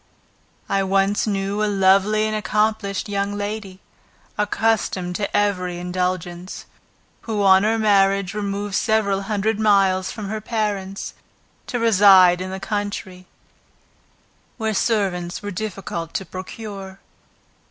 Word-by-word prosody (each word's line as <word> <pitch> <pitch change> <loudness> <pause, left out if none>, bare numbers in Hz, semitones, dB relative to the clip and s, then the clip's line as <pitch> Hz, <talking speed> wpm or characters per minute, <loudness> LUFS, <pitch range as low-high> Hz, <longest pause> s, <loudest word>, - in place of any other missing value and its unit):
I 195 - +1
once 195 +2 +1
knew 200 +1 -1
a 210 - +1
lovely 200 +2 +3
and 215 0 -1
accomplished 210 -1 0
young 200 0 -2
lady, 205 -2 -5 0.6
accustomed 210 -4 0
to 205 0 -1
every 180 -4 0
indulgence, 180 0 -3 0.6
who, 215 -3 -1
on 190 -1 +6
her 220 +2 +1
marriage, 195 -2 +2
removed 205 -1 -3
several 200 -2 +1
hundred 210 +1 -1
miles 195 -3 +3
from 210 -3 -6
her 215 0 -4
parents, 205 -3 -3 0.5
to 245 - -2
reside 190 -5 +6
in 185 - -4
the 190 0 -5
country, 200 -2 -4 1.3
where 220 -2 -1
servants 190 -5 -1
were 205 - -4
difficult 180 -4 -5
to 190 - -2
procure. 190 +1 -8
200 Hz, 120 wpm, -21 LUFS, 190-210 Hz, 1.3 s, on